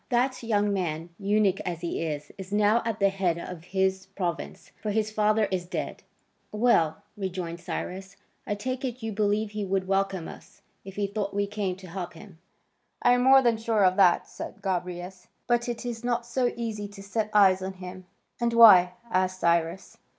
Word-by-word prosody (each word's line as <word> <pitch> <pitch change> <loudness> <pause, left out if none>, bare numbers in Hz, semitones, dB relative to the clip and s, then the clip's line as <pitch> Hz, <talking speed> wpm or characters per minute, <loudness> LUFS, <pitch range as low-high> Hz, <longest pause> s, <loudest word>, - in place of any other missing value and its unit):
That 255 +1 +1
young 205 -3 +1
man, 170 -3 -2
eunuch 200 -1 +2
as 170 -2 -4
he 170 - -3
is, 150 -2 -4
is 190 0 -9
now 210 +2 +3
at 225 -1 -2
the 200 -1 +4
head 190 -4 0
of 170 -1 -8
his 190 0 0
province, 185 -3 -5
for 215 - -3
his 215 +1 0
father 215 0 +2
is 180 -2 -2
dead." - - -4 0.5
"Well," 210 -9 +2
rejoined 180 -4 -4
Cyrus, 190 +3 -6 0.3
"I 205 - -1
take 255 +5 -4
it, 250 -2 -4
you 225 - -2
believe 210 +1 0
he 210 -1 -3
would 190 -1 -1
welcome 195 -3 0
us, - - -13 0.2
if 195 0 -10
he 205 - 0
thought 200 0 -3
we 205 0 +1
came 200 -2 -3
to 190 0 -12
help 175 0 -6
him?" 195 -6 -13 0.6
"I - - +6
am 245 - +2
more 265 +1 +7
than 235 -2 +3
sure 220 -2 +2
of 185 0 +3
that," 185 -3 +4
said 200 - -9
Gobryas, 180 -1 -4 0.2
"but 240 0 +1
it 235 0 -4
is 235 -1 -5
not 240 -1 -1
so 240 +1 0
easy 220 -3 -4
to 200 -1 -12
set 215 +2 -2
eyes 190 -3 +5
on 190 +1 -4
him." 185 0 -10 0.3
"And 235 -1 0
why?" 195 -6 +8 0.2
asked 185 -1 +1
Cyrus. 170 +2 0
195 Hz, 190 wpm, -27 LUFS, 185-220 Hz, 0.6 s, why